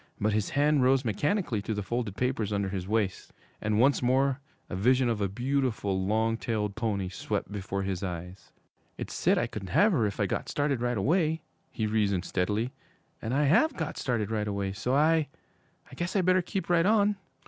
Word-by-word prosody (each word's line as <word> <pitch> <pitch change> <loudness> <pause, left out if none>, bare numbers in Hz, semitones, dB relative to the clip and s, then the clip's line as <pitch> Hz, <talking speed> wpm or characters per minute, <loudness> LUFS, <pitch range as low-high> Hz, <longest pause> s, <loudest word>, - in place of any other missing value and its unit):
But 105 +1 +1
his 105 -1 0
hand 145 0 +4
rose 130 +1 +3
mechanically 130 - 0
to 110 +2 -3
the 105 - -3
folded 115 -1 -3
papers 125 -5 -1
under 100 -1 0
his 95 -2 -4
waist, 105 -3 -1 0.3
and 110 0 +1
once 135 +4 +4
more 130 +2 +2 0.3
a - - -5
vision 125 +6 +3
of 110 -3 -1
a 100 - +1
beautiful, 120 -4 -1
long 110 +3 +1
tailed 105 -3 -2
pony 105 -4 -1
swept 90 +2 -3
before 100 -1 -3
his 95 -2 -2
eyes. 90 0 -6 0.5
'It - - -5
said - - +2
I - - +2
could 100 -3 -7
have 210 - +4
her 120 - +2
if 100 - -6
I - - +3
got - - -3
started 145 -4 0
right 120 -1 0
away,' 160 - +1 0.3
he 110 - -3
reasoned 100 -4 +1
steadily, 105 +6 -1 0.5
'and 110 - -3
I 140 +3 +2
have 175 - +3
got 160 -2 -3
started 110 -4 -1
right 105 -1 -1
away, 100 -1 -2
so 125 +6 -1
I 155 +1 +3 0.6
I - - -13
guess 175 +3 -3
I 195 - +4
better 185 +1 +3
keep 190 +2 -4
right 175 0 +3
on.' 210 -1 +3
115 Hz, 200 wpm, -28 LUFS, 100-140 Hz, 0.6 s, hand